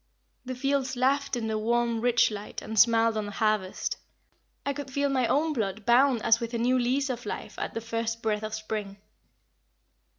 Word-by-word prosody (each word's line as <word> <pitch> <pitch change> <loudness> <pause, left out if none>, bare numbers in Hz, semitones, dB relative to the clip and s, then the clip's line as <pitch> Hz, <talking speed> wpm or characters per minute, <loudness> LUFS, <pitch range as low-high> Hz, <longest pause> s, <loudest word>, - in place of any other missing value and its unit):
The 255 0 -4
fields 270 0 0
laughed 275 +2 +1
in 235 -2 -3
the 220 -1 -1
warm, 235 +1 +1
rich 240 -1 +3
light, 205 0 -7
and 220 -1 -1
smiled 230 0 +5
on 210 -1 -2
the - - -6
harvest. 215 -3 0 0.7
I 280 - 0
could 280 -1 -6
feel 280 +1 0
my 260 -3 +1
own 310 +5 +1
blood 210 -4 -3
bound 245 0 +4
as 225 0 +4
with 235 0 -4
a - - +1
new 250 +2 +2
lease 260 +3 +1
of 240 -1 -5
life - - -6
at - - -4
the 225 - -2
first 230 0 -3
breath 210 -1 0
of 215 0 -3
spring. 215 -2 -5
235 Hz, 195 wpm, -27 LUFS, 220-260 Hz, 0.7 s, smiled